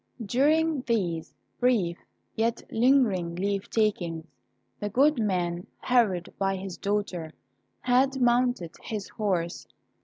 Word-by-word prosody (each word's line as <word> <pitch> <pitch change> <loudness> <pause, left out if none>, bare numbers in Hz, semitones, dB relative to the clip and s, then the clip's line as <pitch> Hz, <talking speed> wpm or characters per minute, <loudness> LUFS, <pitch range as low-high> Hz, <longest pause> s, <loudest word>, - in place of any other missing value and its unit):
During 300 +6 +2
these 175 -8 -1 0.2
brief, 225 -9 +2 0.4
yet 230 +1 0
lingering 225 -9 +3
leave 195 +2 -2
takings, 175 -7 0 0.5
the 205 - -2
good 275 +5 +3
man, 180 -4 -1
hurried 215 -8 +1
by 195 0 +1
his 190 -1 -6
daughter, 200 -6 -2 0.5
had 265 +2 +2
mounted 245 -7 +2
his 210 -3 -5
horse. 185 -6 -2
205 Hz, 110 wpm, -27 LUFS, 180-245 Hz, 0.5 s, lingering